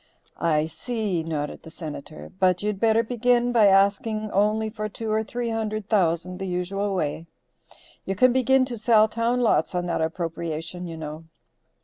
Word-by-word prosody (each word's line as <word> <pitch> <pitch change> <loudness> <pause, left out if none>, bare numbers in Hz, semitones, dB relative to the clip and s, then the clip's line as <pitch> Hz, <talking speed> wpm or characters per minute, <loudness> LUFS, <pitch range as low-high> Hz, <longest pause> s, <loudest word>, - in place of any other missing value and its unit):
"I 155 -2 +2
see," 190 +3 -2
nodded 155 -2 -4
the - - -12
Senator. 140 - -8
"But 185 +1 +2
you'd 210 -2 -1
better 225 +1 +3
begin 245 +1 +1
by 225 -4 +5
asking 200 +2 +2
only 215 +2 +2
for 215 -1 -4
two 220 +1 -5
or 220 0 +1
three 240 +1 -3
hundred 215 -2 -3
thousand, 180 -3 +1
the 190 - -4
usual 190 +3 -2
way. 160 -1 -2 0.8
You 195 - -3
can 255 +5 +4
begin 260 +1 +3
to 240 -3 -6
sell 215 -1 +5
town 235 +3 0
lots 220 -4 +2
on 175 0 -1
that 170 -2 -1
appropriation 165 +1 -4
you 165 -1 -7
know." 155 +1 -7
200 Hz, 165 wpm, -25 LUFS, 170-225 Hz, 0.8 s, by